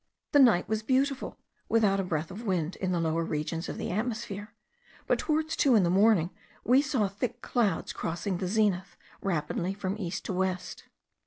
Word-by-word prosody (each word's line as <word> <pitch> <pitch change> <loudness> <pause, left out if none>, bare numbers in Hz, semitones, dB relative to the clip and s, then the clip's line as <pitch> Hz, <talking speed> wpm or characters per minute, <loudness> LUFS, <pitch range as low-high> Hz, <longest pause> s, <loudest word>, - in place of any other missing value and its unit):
The 290 - +5
night 235 -10 +5
was 220 0 -1
beautiful, 265 +3 0 0.3
without 210 -4 +3
a - - +1
breath 160 -3 -2
of 200 +5 -7
wind 185 -5 -1
in 185 -1 -1
the 175 - +1
lower 165 0 0
regions 160 +2 -3
of - - -5
the - - -3
atmosphere, 215 -1 -3 0.5
but - - +1
towards 315 0 0
two 265 -4 +4
in 205 - +5
the 170 - +2
morning 190 -3 +4 0.3
we 255 +4 +5
saw 270 -8 +1
thick 230 +5 -4
clouds 215 -8 0
crossing 175 +2 -3
the 185 - -2
zenith 190 -3 0 0.2
rapidly 180 +1 -1
from 195 -1 -3
east 175 -3 -4
to - - -2
west. 185 0 -2
195 Hz, 180 wpm, -29 LUFS, 175-230 Hz, 0.5 s, The